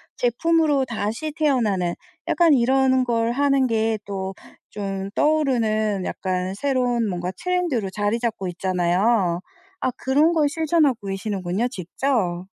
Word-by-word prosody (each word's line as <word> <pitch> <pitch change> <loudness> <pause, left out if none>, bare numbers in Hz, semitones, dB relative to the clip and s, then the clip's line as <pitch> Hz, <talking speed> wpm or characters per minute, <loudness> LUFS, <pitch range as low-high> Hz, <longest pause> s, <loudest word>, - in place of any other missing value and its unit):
제품으로 295 +3 +2
다시 235 +6 -3
태어나는 225 - +1 0.3
약간 335 -3 +4
이런 260 0 +3
걸 235 -1 0
하는 275 0 +2
게 225 -1 +1
또 195 -1 -4 0.4
좀 195 -1 -4
떠오르는 225 -10 +1
약간 185 0 -2
새로운 245 0 0
뭔가 175 -1 -3
트렌드로 350 - -1
자리 205 +4 -1
잡고 225 -5 -2
있잖아요. 180 +1 +1 0.4
아 255 - +1
그런 290 +5 +3
걸 310 -3 +2
실천하고 300 -7 +1
계시는군요 195 +1 -2
직접. 185 -3 -2
230 Hz, 275 characters per minute, -23 LUFS, 195-275 Hz, 0.4 s, 약간